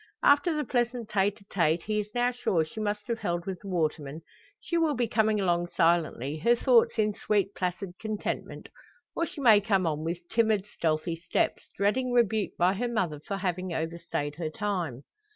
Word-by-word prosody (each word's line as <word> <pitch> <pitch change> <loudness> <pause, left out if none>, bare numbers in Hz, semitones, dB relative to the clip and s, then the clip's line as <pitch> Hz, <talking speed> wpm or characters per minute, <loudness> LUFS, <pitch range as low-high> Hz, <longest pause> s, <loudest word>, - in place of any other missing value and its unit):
After 285 +4 +5
the 300 - 0
pleasant 240 -3 -1
tete 205 0 +1
a - - -19
tete, 165 -4 +1
he 215 0 -1
is 210 0 -4
now 245 +1 +2
sure 180 -9 0
she 160 - -9
must 210 -1 -2
have 235 -1 -2
held 175 -3 -2
with 190 -2 -4
the 200 - -10
waterman, 155 -4 -2 0.4
she 340 - -4
will 325 -3 +2
be 240 -1 0
coming 220 -1 +2
along 175 -2 +1
silently, 160 -5 +1
her 235 +9 +4
thoughts 240 -1 +3
in 210 -1 +2
sweet, 200 -1 0
placid 180 +1 -3
contentment; 215 -2 -4 0.5
or 335 - 0
she 290 - -10
may 220 -5 +7
come 195 -3 +1
on 155 -1 -1
with 170 +1 -4
timid, 220 -4 +2
stealthy 165 -3 -1
steps, 170 0 -1
dreading 245 +6 +1
rebuke 220 -4 +2
by 180 +2 +3
her 245 +5 -2
mother 180 -11 -1
for 195 +6 -4
having 185 -1 -2
overstayed 160 -3 -3
her 165 -2 -2
time. 170 - -3
195 Hz, 190 wpm, -28 LUFS, 170-225 Hz, 0.5 s, may